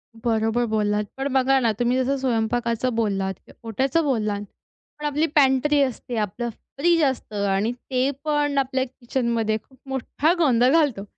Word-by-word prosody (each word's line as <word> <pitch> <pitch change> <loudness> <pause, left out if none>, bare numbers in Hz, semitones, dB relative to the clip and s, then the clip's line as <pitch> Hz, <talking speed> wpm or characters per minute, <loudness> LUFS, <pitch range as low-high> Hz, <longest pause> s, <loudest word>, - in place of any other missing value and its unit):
बरोबर 225 +1 0
बोललात. 210 -1 0
पण 270 +1 -1
बघा 265 0 +3
ना, 230 -3 +2
तुम्ही 245 +1 +2
जसं 275 +2 0
स्वयंपाकाचं 235 -1 0
बोललात, 195 -4 0 0.3
ओट्याचं 265 +8 0
बोललात, 215 -7 0 0.6
पण 300 - -5
आपली 295 +2 +1
पॅन्ट्री 285 +1 +4
असते, 250 -2 -2
आपलं 220 +3 -2
फ्रीज 330 +8 0
असतं 215 -7 -1
आणि 200 +4 +1
ते 255 +2 -1
पण 295 -2 0
आपल्या 260 -1 +1
किचनमध्ये 235 -3 -1
खूप 260 - -24
मोठठा 275 +5 0
गोंधळ 255 -4 +4
घालतो, 285 -11 +2
250 Hz, 145 wpm, -23 LUFS, 225-275 Hz, 0.6 s, पॅन्ट्री